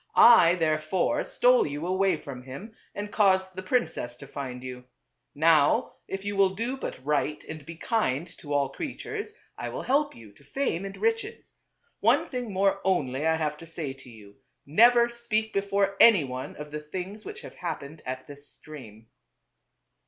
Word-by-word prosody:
I 180 Hz, -8 st, +8 dB
therefore 160 Hz, -, 0 dB
stole 250 Hz, -5 st, +3 dB
you 145 Hz, +3 st, -4 dB
away 185 Hz, -1 st, +2 dB
from 135 Hz, -4 st, -8 dB
him 135 Hz, -, -9 dB, 0.2 s
and 205 Hz, 0 st, -5 dB
caused 190 Hz, -3 st, +3 dB
the 185 Hz, -, -6 dB
princess 185 Hz, -, -1 dB
to 140 Hz, -, -11 dB
find 130 Hz, -3 st, -6 dB
you. 125 Hz, -1 st, -8 dB, 0.5 s
Now, 155 Hz, -1 st, +4 dB
if 195 Hz, +1 st, -5 dB
you 205 Hz, 0 st, -2 dB
will 195 Hz, -1 st, +3 dB
do 235 Hz, +6 st, -2 dB
but 135 Hz, -, -7 dB
right 150 Hz, 0 st, 0 dB
and 155 Hz, -2 st, -8 dB
be 165 Hz, +4 st, -9 dB
kind 165 Hz, -, 0 dB
to 145 Hz, -4 st, -9 dB
all 140 Hz, -1 st, +2 dB
creatures, 425 Hz, +8 st, -6 dB, 0.2 s
I -, -, -3 dB
will -, -, -5 dB
help 285 Hz, +3 st, +1 dB
you 110 Hz, -3 st, -13 dB
to 100 Hz, -, -21 dB
fame 195 Hz, -, -2 dB
and 195 Hz, -, -7 dB
riches. 455 Hz, +1 st, -2 dB, 0.4 s
One -, -, +3 dB
thing 250 Hz, -4 st, -4 dB
more 195 Hz, +1 st, +1 dB
only, 150 Hz, -6 st, 0 dB
I 160 Hz, -, +3 dB
have 150 Hz, -2 st, -2 dB
to 165 Hz, -, -12 dB
say 155 Hz, -4 st, -4 dB
to 135 Hz, -1 st, -14 dB
you 105 Hz, -3 st, -15 dB, 0.2 s
— -, -, -52 dB
never 235 Hz, -, +6 dB
speak 235 Hz, -2 st, -2 dB
before 200 Hz, 0 st, +1 dB
any 220 Hz, -9 st, +7 dB
one 130 Hz, -1 st, -6 dB
of 150 Hz, 0 st, -9 dB
the 150 Hz, -, -4 dB
things 185 Hz, +7 st, -6 dB
which -, -, -8 dB
have -, -, -10 dB
happened 155 Hz, -3 st, -6 dB
at 130 Hz, 0 st, -5 dB
this 145 Hz, 0 st, -12 dB
stream." 115 Hz, -8 st, -12 dB
165 Hz, 180 wpm, -27 LUFS, 140-205 Hz, 0.5 s, I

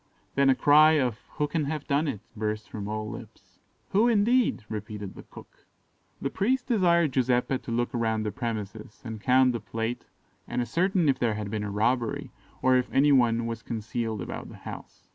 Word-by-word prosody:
Then 140 Hz, 0 st, +3 dB
a 135 Hz, -, +5 dB
cry 155 Hz, +3 st, +6 dB
of 125 Hz, -7 st, +1 dB
"Who 150 Hz, -, 0 dB
can 155 Hz, -1 st, -1 dB
have 150 Hz, 0 st, -3 dB
done 150 Hz, +2 st, +1 dB
it?" 115 Hz, -8 st, -3 dB
burst 105 Hz, 0 st, -3 dB
from 100 Hz, -2 st, -5 dB
all 110 Hz, 0 st, -3 dB
lips. -, -, -11 dB, 0.3 s
"Who, 215 Hz, +5 st, +3 dB
indeed?" 235 Hz, -, +2 dB
repeated 105 Hz, -2 st, -6 dB
the -, -, -10 dB
cook. -, -, -16 dB, 0.5 s
The 140 Hz, -, -3 dB
priest 250 Hz, +6 st, 0 dB
desired 170 Hz, -, +3 dB
Giuseppe 125 Hz, 0 st, +1 dB
to -, -, -8 dB
look 120 Hz, +1 st, 0 dB
round 110 Hz, -2 st, 0 dB
the 105 Hz, -, -1 dB
premises, 110 Hz, -2 st, -5 dB
and 110 Hz, -2 st, -6 dB
count 130 Hz, +1 st, +4 dB
the 120 Hz, -, -3 dB
plate, 115 Hz, +3 st, -4 dB, 0.4 s
and -, -, -2 dB
ascertain 170 Hz, -, +1 dB
if 135 Hz, -2 st, +2 dB
there 115 Hz, -3 st, +1 dB
had 105 Hz, -1 st, -5 dB
been 105 Hz, -1 st, -2 dB
a 105 Hz, -, -3 dB
robbery, 115 Hz, +3 st, 0 dB, 0.3 s
or 130 Hz, 0 st, +5 dB
if 125 Hz, -, -1 dB
any 145 Hz, +2 st, +4 dB
one 120 Hz, -3 st, +3 dB
was 115 Hz, -1 st, -4 dB
concealed 110 Hz, -2 st, -3 dB
about -, -, -7 dB
the -, -, -11 dB
house. -, -, -9 dB
120 Hz, 190 wpm, -27 LUFS, 110-145 Hz, 0.5 s, cry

